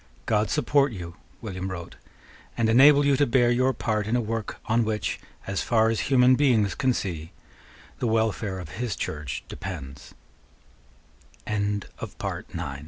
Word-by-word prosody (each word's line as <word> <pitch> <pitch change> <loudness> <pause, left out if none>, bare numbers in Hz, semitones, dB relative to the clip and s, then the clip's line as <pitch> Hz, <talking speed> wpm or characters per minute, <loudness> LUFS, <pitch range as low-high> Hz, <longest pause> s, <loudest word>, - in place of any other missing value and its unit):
"God 105 -1 +1
support 145 -2 +2
you," 85 -4 -7 0.3
William 95 -3 -4
wrote, 85 -3 -7 0.6
"and 115 -1 +2
enable 140 +5 +7
you 140 -1 +4
to 145 - +3
bear 120 0 +3
your 130 +2 +3
part 110 -4 -1
in 115 - +1
a - - +3
work 115 -2 -3
on 115 +1 +2
which, 110 -3 -2 0.3
as 95 0 -2
far 110 -2 +3
as 115 - -1
human 130 -1 +6
beings 125 -7 +3
can 130 -4 +1
see, 85 -9 -4 0.7
the 120 - 0
welfare 110 -3 0
of 90 -4 -7
his 120 -5 -1
Church 75 -3 -4
depend 70 -7 -8
110 Hz, 140 wpm, -26 LUFS, 95-125 Hz, 0.7 s, enable